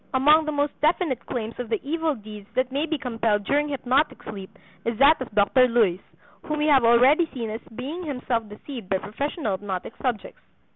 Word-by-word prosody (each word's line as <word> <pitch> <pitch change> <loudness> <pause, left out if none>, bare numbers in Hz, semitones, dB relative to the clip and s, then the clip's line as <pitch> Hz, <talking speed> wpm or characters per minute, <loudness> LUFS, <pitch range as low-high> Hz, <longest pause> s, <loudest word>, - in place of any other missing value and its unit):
Among 300 +4 +5
the 305 - -1
most 290 0 0
definite 310 -4 +1
claims 230 -2 -4
of 245 -3 -4
the 220 -3 0
evil 320 -1 0
deeds 210 -2 -11
that 255 0 0
may 285 +4 -1
be 320 -1 -1
compelled 225 -5 -1
during 290 +7 +1
hypnotic 275 +2 0
sleep 195 -3 -9 0.3
is 230 -1 -2
that 280 +3 +5
of 260 - -4
Dr. 210 +5 +4
Luys, 220 -7 +2 0.4
whom 305 - -3
we 300 - 0
have 280 -4 +5
already 255 +8 +5
seen 230 -5 -4
as 220 - -5
being 290 +9 -5
himself 250 -6 -2
deceived 215 0 -9
by 190 - +2
professional 250 - -3
hypnotic 190 +1 -4
subjects. 245 -6 -3
250 Hz, 190 wpm, -24 LUFS, 220-295 Hz, 0.4 s, Among